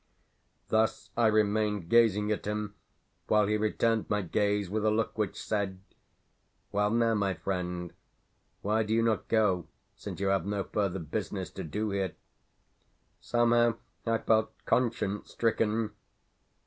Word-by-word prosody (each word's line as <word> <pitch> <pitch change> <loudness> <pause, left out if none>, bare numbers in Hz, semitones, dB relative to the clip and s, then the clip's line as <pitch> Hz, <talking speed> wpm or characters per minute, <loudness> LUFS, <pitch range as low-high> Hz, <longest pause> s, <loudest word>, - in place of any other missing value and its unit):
Thus 110 0 +1
I 115 -1 +4
remained 105 -3 +1
gazing 105 -1 +4
at 105 - -2
him 105 0 -2 0.5
while 105 -1 +4
he 105 +1 +1
returned 110 +1 +1
my 105 -1 +1
gaze 100 +2 0
with 105 +3 -2
a 110 - +4
look 110 +1 0
which 105 -2 -2
said, 100 -3 -2 0.9
"Well 105 +1 +2
now, 115 +1 +2
my 100 -3 0
friend? 90 -2 -3 0.7
Why 110 +2 +2
do 110 0 0
you 115 - +3
not 115 -1 0
go 95 -7 +2 0.3
since - - -7
you 100 0 +1
have 95 -2 +1
no 100 -1 -1
further 100 -2 -1
business 80 -5 -4
to - - -6
do 105 +7 -2
here?" 95 -2 -1 1.0
Somehow 120 -1 +3 0.3
I 115 -1 +1
felt 110 -1 +2 0.2
conscience 115 -4 0
stricken. 110 -1 +1
105 Hz, 140 wpm, -30 LUFS, 100-110 Hz, 1.0 s, I